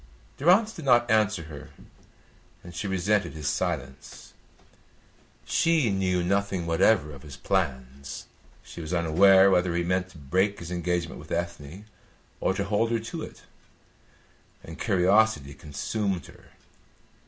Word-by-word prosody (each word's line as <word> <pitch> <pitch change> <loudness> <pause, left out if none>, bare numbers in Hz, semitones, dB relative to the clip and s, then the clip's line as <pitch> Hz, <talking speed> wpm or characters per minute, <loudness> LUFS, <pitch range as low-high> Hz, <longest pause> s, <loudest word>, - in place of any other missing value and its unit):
Durrance 195 +9 +4
did 165 - -9
not 120 -2 +4
answer 110 -5 +2
her, 75 -3 -10 0.9
and 85 - -11
she 90 +4 -4
resented 95 +2 0
his 75 -3 -5
silence. 70 -7 -4 1.1
She 165 -9 +2
knew 95 -2 0
nothing 100 -1 0
whatever 80 -1 +2
of 70 -2 -11
his 70 -3 -11
plans; 70 -7 -3 0.4
she - - -10
was 80 +3 -3
unaware 95 +4 +5
whether 90 -2 +2
he 85 - 0
meant 90 +1 -1
to 90 - -15
break 95 +8 0
his 85 -2 -8
engagement 85 -1 -2
with 75 - -13
Ethne 85 +2 -5 0.5
or 95 - 0
to 100 - -1
hold 105 +3 0
her 115 0 0
to 115 +1 -6
it, - - -10 1.2
and 80 - -10
curiosity 95 - +2
consumed 90 +5 -3
her. - - -16
90 Hz, 135 wpm, -26 LUFS, 80-105 Hz, 1.2 s, unaware